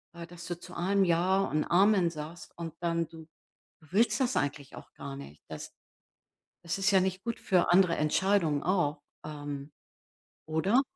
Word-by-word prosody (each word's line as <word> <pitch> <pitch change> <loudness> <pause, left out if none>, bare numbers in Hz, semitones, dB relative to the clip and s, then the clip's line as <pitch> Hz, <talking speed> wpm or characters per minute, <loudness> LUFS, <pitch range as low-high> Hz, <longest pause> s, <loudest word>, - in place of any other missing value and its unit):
ja, 170 0 -7
dass 170 0 -11
du 175 -1 -4
zu 180 0 -11
allem 195 +3 +2
„Ja 180 +3 +3
und 155 -6 0
Amen“ 190 0 +4
sagst 155 +2 -8
und 165 -2 -5
dann 170 -1 0
du 160 -1 -13 0.5
willst 195 - +2
das 255 0 +1
eigentlich 145 -1 -2
auch - - -12
gar 140 -1 -7
nicht, 75 - -11
das - - -8 0.9
das 170 +2 -1
ist 195 +1 +2
ja 190 -1 +5
nicht 190 +1 -2
gut 235 -1 -3
für 180 -2 +2
andere 180 -2 +5
Entscheidungen 160 -1 +2
auch. 175 -5 +1 0.2
Ähm. 145 -1 -6 0.8
Oder? 190 +11 +3
170 Hz, 165 wpm, -30 LUFS, 155-190 Hz, 0.9 s, ja